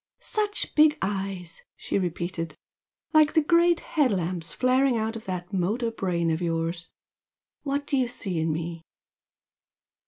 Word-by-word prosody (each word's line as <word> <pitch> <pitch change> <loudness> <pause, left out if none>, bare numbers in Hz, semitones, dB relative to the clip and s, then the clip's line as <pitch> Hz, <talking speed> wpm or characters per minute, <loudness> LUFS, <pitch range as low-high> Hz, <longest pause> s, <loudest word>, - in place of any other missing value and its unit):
"Such 420 -1 -1
big 305 0 +5
eyes!" 190 -3 -3 0.2
she - - -1
repeated 170 -2 -3 0.6
"Like 310 0 +5
great 340 +1 +4
head 295 -5 +1
lamps 175 -4 -2
flaring 255 - +2
out 220 +1 -1
of 225 - -7
that 180 0 -5
motor 215 +6 0
brain 175 -6 0
of 160 +2 -1
yours! 165 0 -1 0.7
What 285 0 -2
do 285 - 0
you 255 -2 +2
see 190 -7 -3
in 160 0 +1
me?" 165 +1 -4
195 Hz, 135 wpm, -26 LUFS, 170-275 Hz, 0.7 s, big